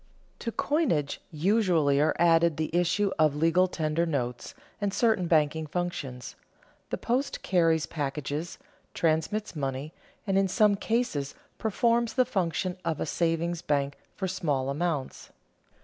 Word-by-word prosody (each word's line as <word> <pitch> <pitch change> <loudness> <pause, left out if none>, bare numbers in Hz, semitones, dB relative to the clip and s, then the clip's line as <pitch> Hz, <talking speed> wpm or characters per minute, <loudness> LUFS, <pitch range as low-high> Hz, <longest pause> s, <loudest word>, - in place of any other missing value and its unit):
To 230 - -3
coinage 230 - 0
usually 165 -5 +2
are 155 - +2
added 165 -2 +4
the 160 +1 -2
issue 185 +3 +2
of 155 -2 +4
legal 165 +4 +3
tender 165 -1 -1
notes 125 -6 -3 0.3
and 200 -1 0
certain 220 -4 +2
banking 155 -1 +2
functions; 145 -7 -4 0.5
the - - -2
post 255 +4 -1
carries 165 -4 +2
packages, 150 +2 -4 0.4
transmits 165 +6 0
money, 140 +1 -3 0.3
and 195 -2 +2
in 195 - +2
some 210 +2 +4
cases 200 - -1 0.2
performs 235 +2 +1
the 255 -1 +4
function 185 -4 -1
of 165 -3 -2
a - - -1
savings 170 0 -1
bank 140 -1 0 0.2
for 190 - -2
small 145 -8 -1
amounts. 150 -2 -3
165 Hz, 135 wpm, -28 LUFS, 150-195 Hz, 0.5 s, added